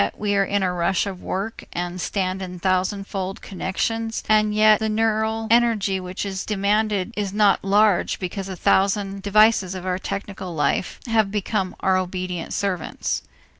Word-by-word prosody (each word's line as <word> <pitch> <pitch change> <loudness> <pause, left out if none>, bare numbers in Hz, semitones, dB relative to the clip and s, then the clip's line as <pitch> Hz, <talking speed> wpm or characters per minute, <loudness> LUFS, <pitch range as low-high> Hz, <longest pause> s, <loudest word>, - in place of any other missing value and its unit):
We 205 -1 0
are 200 - +4
in 200 0 0
a 180 -1 0
rush 175 +2 +1
of 190 -2 -6
work 200 +4 -4
and 175 +1 -3
stand 190 -1 -2
in 180 -1 -6
thousandfold 190 +1 -1
connections; 225 +4 -2
and 215 -1 +4
yet 215 0 +5
the 220 - -1
neural 220 0 0
energy 225 -5 +3
which 185 +2 -5
is 190 -1 -3
demanded 210 0 0
is 205 -2 -2
not 205 0 +3
large 205 0 +3
because 190 +1 -5
a 190 - -4
thousand 195 +2 +1
devices 205 -2 +4
of 185 0 -6
our 185 0 -1
technical 195 -2 -5
life 150 +4 0
have 225 -4 +2
become 200 -2 -2
our 190 -1 +3
obedient 185 -2 -3
servants. 185 -4 -2
195 Hz, 160 wpm, -23 LUFS, 185-215 Hz, -, yet